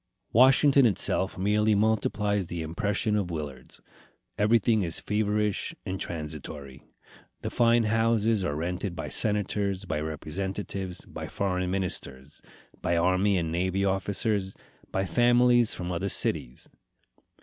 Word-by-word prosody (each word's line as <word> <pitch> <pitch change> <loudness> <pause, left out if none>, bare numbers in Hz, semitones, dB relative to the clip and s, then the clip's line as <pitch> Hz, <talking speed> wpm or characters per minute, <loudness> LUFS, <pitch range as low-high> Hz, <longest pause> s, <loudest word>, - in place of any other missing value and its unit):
Washington 135 +2 +6
itself 95 -2 +1
merely 105 +3 +2
multiplies 105 -2 0
the 85 -1 -4
impression 100 +6 -1
of 100 -4 -1
Willard's. 75 -6 -7 0.5
Everything 110 +1 +3
is 85 -3 -2
feverish 105 -1 -1
and 95 0 -4
transitory. 75 -4 -7 0.6
The - - -4
fine 120 -1 +3
houses 115 -1 +1
are 75 -5 -2
rented 90 +3 -3
by - - -5
senators, 100 -2 0
by 75 - -2
representatives, 95 +4 -5
by - - -7
foreign 90 -2 -2
ministers, 75 -7 -4 0.4
by 85 0 0
army 95 +3 +2
and 85 -2 -2
navy 95 +3 0
officers, 95 +1 -1 0.4
by 95 0 -1
families 120 +4 +3
from 90 0 -5
other 90 +3 -2
cities. 60 -7 +2
95 Hz, 120 wpm, -27 LUFS, 85-105 Hz, 0.6 s, Washington